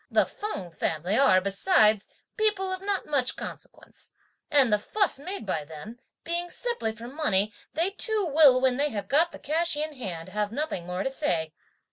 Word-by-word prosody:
The - - +4
Feng 410 - -6
family 165 +4 -2
are, 225 -8 +5
besides, 210 - +3 0.3
people 415 -4 +1
of 375 - -5
not 395 0 -2
much 275 -4 0
consequence, - - -10 0.4
and 275 -8 +4
(the 210 - +4
fuss 400 - +1
made 370 - -6
by 160 -6 -2
them) 160 +10 -10 0.2
being 345 +1 -3
simply 475 - -2
for 230 +2 -10
money, 215 -8 +1 0.2
they 340 +5 +1
too 425 0 0
will, 290 -5 +6
when 255 -1 +2
they 290 +1 +1
have 205 -5 -5
got 330 +5 +3
the - - -9
cash 320 +1 -1
in 305 +1 -2
hand, 185 - -6
have 210 0 -2
nothing 235 - -3
more 180 +2 -3
to 265 - -2
say. 165 - -1
265 Hz, 180 wpm, -27 LUFS, -, 0.4 s, will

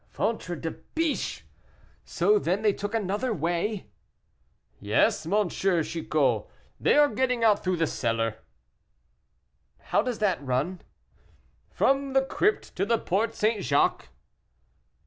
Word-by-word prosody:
'" - - -37
"Ventre 210 -5 -2
de 165 +1 -4
biche! 325 -2 -3 0.6
so 420 0 +2
then 205 - -1
they 210 -2 +4
took 205 +3 -4
another 215 +4 -1
way?" 175 +3 -1 0.9
"Yes, 105 +8 +1
dear 205 +6 +2
M. 195 - -1 0.3
Chicot, 145 -9 0 0.3
they - - +3
are 295 0 +7
getting 250 -4 0
out 210 -2 +4
through 185 -1 0
the 165 - +2
cellar." 115 -5 -1 1.4
"How - - 0
does 240 0 -3
that 190 -8 0
run?" 140 +8 -1 0.9
"From 275 0 +1
the 270 0 +3
crypt 415 +9 0
to 185 - +1
the 230 +3 +2
Porte 215 +3 -1
St. 215 -1 0
Jacques." 140 0 +1
205 Hz, 130 wpm, -27 LUFS, 165-235 Hz, 1.4 s, are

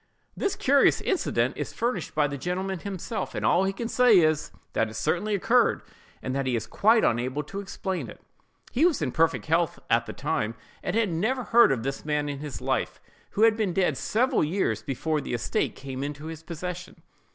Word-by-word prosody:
This 400 - -1
curious 275 +1 +4
incident 380 - 0
is - - -4
furnished 230 -7 -2
by 150 -1 +3
the 140 - -5
gentleman 180 +5 -3
himself 200 +4 -5
and - - -2
all 185 +2 +4
he 195 - +1
can 230 +4 -4
say 245 -3 +5
is, 155 -3 +2 0.2
that 110 - +1
it 110 - -10
certainly 190 - 0
occurred, 235 +5 +2 0.4
and 130 - -2
that 135 -1 -1
he 125 - +1
is 110 -1 -2
quite 220 - +3
unable 130 +5 0
to 195 +7 -7
explain 190 -1 -4
it. - - -11 0.5
He 260 - +1
was 335 - +3
in 130 - -1
perfect 165 +4 +1
health 165 +1 +1
at 115 +1 +3
the - - -5
time, 115 -7 -2 0.3
and 180 - -2
had 225 -3 +2
never 220 +10 0
heard 235 -4 +5
of 120 -4 -1
this 135 +1 -3
man 150 -1 -1
in 140 -1 -4
his 150 -2 -6
life, - - -1 0.4
who 215 - +4
had 225 -1 +6
been 210 -5 -1
dead 180 -6 +2
several 250 - +1
years 150 - 0
before 150 +6 -2
the 125 - -3
estate 120 - -1
came 135 -1 -6
into 145 +1 -5
his 160 -1 -7
possession. 180 +2 -7
170 Hz, 205 wpm, -26 LUFS, 140-215 Hz, 0.5 s, had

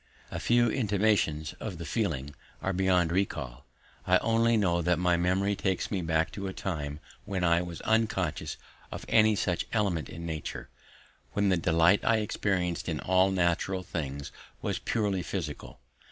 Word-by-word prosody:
The - - -3
first 120 -1 +3
intimations 100 - +1
of 100 -6 -5
the 85 - -6
feeling 75 - -2 0.3
are 95 - -1
beyond 90 -2 +2
recall; 70 -9 -2 0.4
I - - +6
only 115 +1 +2
know 85 -4 +2
that 90 0 +2
my 90 0 +2
memory 95 +4 +1
takes 95 -2 -1
me 95 -3 0
back 80 -1 +1
to 100 -1 -5
a 95 - -4
time 75 -7 -4 0.3
when 95 -2 -2
I 85 0 +4
was 85 -2 -6
unconscious 110 0 0 0.3
of - - -6
any 110 -1 +5
such 90 -3 -1
element 95 - 0
in 85 +1 -7
nature, 80 -3 -5 0.6
when 100 -1 +2
the 95 - +4
delight 85 +3 +4
I 115 - +3
experienced 95 -5 -1
in - - -2
all 95 +1 +3
natural 95 +1 0
things 70 -5 -5 0.3
was - - -2
purely 105 -5 0
physical. 85 -4 -5
90 Hz, 160 wpm, -29 LUFS, 85-100 Hz, 0.6 s, I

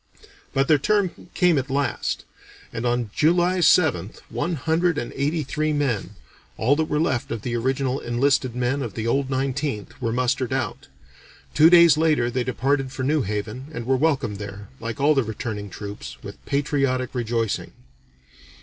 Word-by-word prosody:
But 135 0 +1
their 150 -2 +5
turn 195 0 0
came 175 -5 +4
at 135 +1 -5
last, 135 -3 -1 0.5
and 115 +2 -2
on 120 -3 -1
July 175 +3 +3
7th, 140 - +3
one 170 0 -2
hundred 160 +3 +1
and 120 - -4
eighty 150 +3 0
three 155 +3 -1
men, 120 -9 -1 0.4
all 130 +6 +3
that 160 - +1
were 150 - +1
left 130 -7 0
of 115 -3 -4
the 120 -1 -2
original 130 +2 0
enlisted 130 +1 +1
men 125 +3 0
of 115 -6 -5
the 110 - -3
"old 135 +3 +1
Nineteenth," 135 -3 -2
were 115 -2 0
mustered 125 +1 0
out; 130 -1 -3 0.7
two 155 +2 +7
days 170 -3 +7
later 155 -6 +2
they 125 0 0
departed 135 +2 0
for 130 0 -4
New 150 +3 +2
Haven 105 +5 -4
and 120 - -4
were 130 +2 +2
welcomed 135 -7 0
there, 100 0 -8
like 115 -1 -5
all 145 +2 +4
the 135 - +3
returning 105 -2 -5
troops, 100 +2 -8
with - - -10
patriotic 135 -3 0
rejoicing. 115 -3 -1
130 Hz, 170 wpm, -23 LUFS, 120-150 Hz, 0.7 s, two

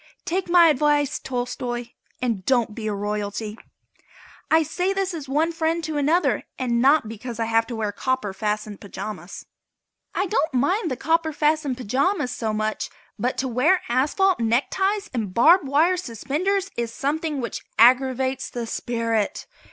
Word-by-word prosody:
Take 360 +1 -2
my 345 -1 +7
advice, 295 -1 +2
Tolstoi, 245 -1 -4 0.3
and 225 -6 -1
don't 240 -2 +1
be 220 0 -5
a - - 0
royalty. 210 +1 -3 0.9
I 320 +2 +5
say 360 +5 -1
this 390 -1 -1
as 295 -5 -6
one 310 +4 +1
friend 330 0 -1
to 310 -1 -3
another 295 -1 +2
and 235 -2 0
not 275 -2 +4
because 230 +1 -7
I 225 - +1
have 225 0 +2
to 240 - -5
wear 215 -2 -2
copper 235 -2 -2
fastened 210 0 -3
pajamas. 195 -3 -7 0.7
I 380 - +1
don't 340 - 0
mind 345 - +1
the 255 - -3
copper 320 +3 +1
fastened 300 -3 +1
pajamas 265 - 0
so 220 -2 -2
much, 215 0 -2 0.3
but 250 +4 -1
to 265 - -1
wear 270 +10 +2
asphalt 300 +10 +2
neckties 385 - +1
and 215 -7 -3
barb 315 +6 +6
wire 320 +7 +3
suspenders 360 - -2
is 235 -1 -2
something 300 +3 -2
which 235 -3 -4
aggravates 260 +2 +3
the 240 -1 -4
spirit. 230 -2 -2
260 Hz, 155 wpm, -23 LUFS, 230-320 Hz, 0.9 s, my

